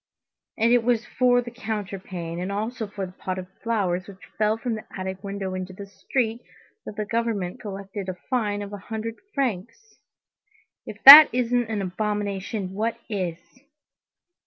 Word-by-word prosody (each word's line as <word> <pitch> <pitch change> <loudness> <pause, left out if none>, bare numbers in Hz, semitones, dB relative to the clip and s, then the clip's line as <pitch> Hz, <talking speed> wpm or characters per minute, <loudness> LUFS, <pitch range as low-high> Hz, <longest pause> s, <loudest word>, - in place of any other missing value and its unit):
And 230 +2 +3
it 245 -2 +4
was 235 -1 +1
for 245 -1 +2
the 240 - -8
counterpane, 195 -7 -5
and 185 +2 -3
also 220 +3 -3
for 200 -1 -6
a 185 - -6
pot 185 0 -5
of 185 - -5 0.2
flowers 190 -6 -1
which 195 -2 -13
fell 215 +1 +1
from 235 +1 -3
the 215 - -6
attic 190 +1 -5
window 195 -1 -4
into 185 0 -5
the 200 +2 -9
street, 230 +3 -2 0.5
that - - -7
the 210 0 -3
government 220 -5 -2
collected 195 -1 -6
a 185 - -4
fine 210 -5 -1
of 200 0 -9
a 205 - -6
hundred 225 +1 -4 0.2
francs. 275 - -4 0.9
If - - -9
that 290 +3 +13
isn't 245 -1 0
an 210 -3 -2
abomination, 200 0 -3
what 220 +3 -2
is!" 185 -6 -2
210 Hz, 160 wpm, -24 LUFS, 190-230 Hz, 0.9 s, that